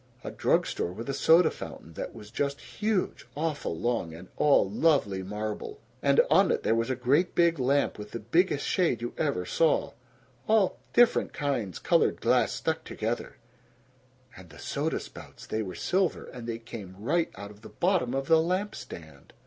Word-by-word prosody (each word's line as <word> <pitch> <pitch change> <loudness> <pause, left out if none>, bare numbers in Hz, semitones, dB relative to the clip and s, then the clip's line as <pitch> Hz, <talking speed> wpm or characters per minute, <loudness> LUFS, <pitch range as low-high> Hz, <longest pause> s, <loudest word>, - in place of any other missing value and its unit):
A - - -5
drug - - +2
store 85 - -3
with 110 +6 -7
a - - -4
soda 160 +4 +5
fountain 80 - -9
that - - -6
was 105 0 -11
just 140 +2 -2
huge, 185 - -2
awful 150 - -2
long, 110 -7 -1
and 90 +3 -12
all 140 -9 +4
lovely 105 -4 +2
marble; 105 +3 -5 0.2
and 140 0 +3
on 185 +6 +5
it - - 0
there - - +2
was 115 +2 0
a 130 - 0
great 135 +8 +1
big 170 -3 +3
lamp 135 -2 +1
with 105 0 -7
the 115 - -5
biggest 145 - +1
shade 160 - +1
you 120 - -4
ever 140 - -1
saw 160 - +2 0.6
all 215 -3 +3
different 240 -1 +4
kinds 120 - -2
colored - - +2
glass - - +3
stuck - - -2
together; - - -4 1.0
and 95 -2 -13
the 75 - -14
soda - - -2
spouts, - - -11
they 110 - -2
were 95 -4 -5
silver, 185 - 0
and 120 -2 -9
they 115 -1 -3
came 110 -5 -9
right 155 - 0
out 100 0 -8
of 105 0 -16
the - - -11
bottom 175 -9 0
of 135 0 -1
the 160 -1 +5
lamp 185 +5 -1
stand! 80 -4 -11
125 Hz, 180 wpm, -28 LUFS, 105-165 Hz, 1.0 s, soda